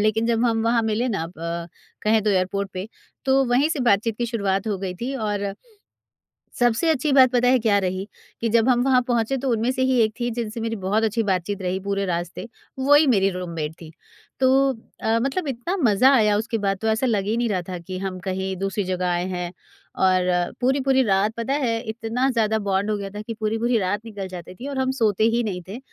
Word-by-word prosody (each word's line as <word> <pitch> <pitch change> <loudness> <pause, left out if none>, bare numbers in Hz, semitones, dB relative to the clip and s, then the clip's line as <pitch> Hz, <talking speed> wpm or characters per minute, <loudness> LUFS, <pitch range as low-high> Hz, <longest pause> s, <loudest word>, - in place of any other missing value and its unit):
लेकिन 220 +1 +1
जब 230 0 +1
हम 225 -2 +1
वहाँ 230 0 +2
मिलें 220 +3 0
ना 195 -8 -2
ब 170 +1 -4 0.3
कहें 220 +1 +3
तो 210 - +1
एयरपोर्ट 195 +1 0
पे, 185 +3 -5 0.4
तो 270 0 +3
वहीं 260 +5 +2
से 315 -4 -2
बातचीत 220 0 +2
की 240 - 0
शुरुआत 200 -4 -1
हो 200 -3 -1
गई 185 -1 -4
थी 255 +3 -3
और 210 -4 -2 1.2
सबसे 240 +7 +2
अच्छी 300 -1 +1
बात 260 -2 +6
पता 245 0 +2
है 255 +1 +5
क्या 215 -3 +3
रही? 185 +1 -2 0.3
कि 230 - 0
जब 230 +2 +3
हम 245 -1 +3
वहाँ 260 -1 +4
पहुँचे, 240 +2 +1
तो 270 +1 -2
उनमें 230 +2 +1
से 260 0 -3
ही 260 -1 +2
एक 215 -1 +2
थीं 240 0 -1
जिनसे 230 -1 -4
मेरी 225 0 -2
बहुत 210 +4 +1
अच्छी 225 +1 +1
बात-चीत 195 0 -1
रही 185 0 -1
पूरे 200 0 0
रास्ते। 175 +3 -3 0.3
वही 290 +3 +5
मेरी 195 -6 +3
रूममेट 170 -4 -4
थीं। 160 - -10 0.5
तो 260 -1 +4 0.5
अ, 225 +1 +2
मतलब 285 +6 -1
इतना 275 +9 -3
मज़ा 240 +3 +5
आया 210 -3 +4
उसके 225 +1 -2
बाद, 195 -2 0
तो 220 - -1
ऐसा 220 +4 +1
लग 215 -6 +1
ही 220 +3 0
नहीं 240 -1 0
रहा 190 -3 0
था 180 - -4
कि 185 +2 -7
हम 190 -1 -4
कहीं 190 0 -2
दूसरी 195 +2 -2
जगह 185 -1 -2
आए 175 0 0
हैं 180 -2 -4 0.6
और 180 -1 +1
पूरी-पूरी 265 +1 +2
रात 200 -1 +2
पता 230 +4 -1
है, 245 -6 0
इतना 230 +4 -1
ज़्यादा 220 -2 +1
बॉन्ड 195 +1 0
हो - - +1
गया 200 -1 -5
था 210 +1 -7
कि 230 +2 -6
पूरी-पूरी 225 +2 0
रात 200 +1 -1
निकल 205 -4 -6
जाती 180 -1 -8
थी 250 +8 -8
और 280 - -5
हम 260 0 +1
सोते 215 -4 +2
ही 240 - +2
नहीं 185 -4 -3
थे 205 +6 -7
220 Hz, 220 wpm, -23 LUFS, 195-240 Hz, 1.2 s, बात